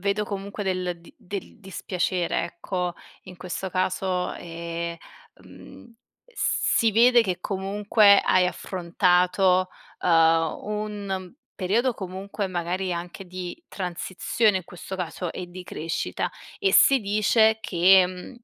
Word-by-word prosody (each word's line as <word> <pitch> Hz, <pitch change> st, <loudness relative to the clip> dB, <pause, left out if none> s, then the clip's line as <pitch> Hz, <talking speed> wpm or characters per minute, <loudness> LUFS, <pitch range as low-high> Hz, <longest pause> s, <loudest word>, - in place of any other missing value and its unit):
vedo 200 Hz, +2 st, 0 dB
comunque 200 Hz, 0 st, -5 dB
del 180 Hz, -2 st, -2 dB
di 170 Hz, -, -17 dB
del 200 Hz, +1 st, -7 dB
dispiacere, 185 Hz, -3 st, -2 dB
ecco, 180 Hz, +1 st, -4 dB, 0.3 s
in 185 Hz, -1 st, -12 dB
questo 185 Hz, +1 st, -5 dB
caso, 185 Hz, 0 st, -1 dB
ehm, 170 Hz, 0 st, -5 dB, 0.5 s
mhmm, 235 Hz, -, -15 dB, 0.4 s
si 225 Hz, -, +1 dB
vede 240 Hz, +2 st, +6 dB
che 185 Hz, -4 st, -3 dB
comunque 200 Hz, +2 st, +3 dB
hai 185 Hz, -1 st, +3 dB
affrontato, 180 Hz, +1 st, +2 dB, 0.3 s
uhm, 165 Hz, -1 st, +3 dB
un 205 Hz, -3 st, -4 dB, 0.2 s
periodo 225 Hz, +7 st, +1 dB
comunque 195 Hz, +1 st, -5 dB
magari 180 Hz, +1 st, -2 dB
anche 175 Hz, +2 st, -6 dB
di 185 Hz, -, -7 dB
transizione 190 Hz, +3 st, 0 dB
in 185 Hz, -, -10 dB
questo 180 Hz, +3 st, -8 dB
caso 180 Hz, -1 st, -4 dB
e 180 Hz, -, -6 dB
di 180 Hz, +1 st, -9 dB
crescita, 165 Hz, -1 st, -3 dB, 0.3 s
e 395 Hz, -1 st, +1 dB
si 270 Hz, -1 st, +7 dB
dice 215 Hz, +2 st, +3 dB
che, 185 Hz, 0 st, +5 dB
mhmm, 180 Hz, 0 st, -8 dB
185 Hz, 120 wpm, -25 LUFS, 180-200 Hz, 0.5 s, si